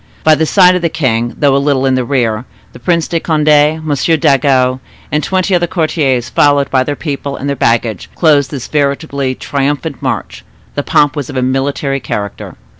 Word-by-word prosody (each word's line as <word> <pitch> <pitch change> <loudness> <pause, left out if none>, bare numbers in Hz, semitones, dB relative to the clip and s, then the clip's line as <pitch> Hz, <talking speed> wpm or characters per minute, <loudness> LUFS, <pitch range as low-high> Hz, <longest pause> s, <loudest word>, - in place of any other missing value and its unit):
By 155 - +5
the 160 +1 +1
side 185 0 +5
of 180 - -1
the 170 - +1
king, 120 -7 -1
though 140 -2 +3
a 140 - +2
little 140 -2 +1
in 135 - +2
the 130 -1 +1
rear, 120 -3 -1 0.3
the - - -12
Prince 170 +5 0
de 170 - -1
Conde, 155 -2 -1
M. 150 +1 +3
Dangeau, 135 -3 +2 0.3
and 150 0 0
twenty 190 0 0
other 175 -1 +2
courtiers, 155 -8 0
followed 145 -1 +2
by 130 -1 +3
their 145 +2 -3
people 140 -2 -4
and 140 - -5
their 140 - -1
baggage, 115 -5 0
closed 145 -5 +3
this 130 -3 -6
veritably 140 -2 -1
triumphant 145 +2 -3
march. - - -4 0.3
The - - -2
pomp 145 -1 +2
was 145 -4 -4
of - - -5
a 130 - 0
military 135 +1 -1
character. 105 -4 -5
140 Hz, 190 wpm, -13 LUFS, 130-155 Hz, 0.3 s, By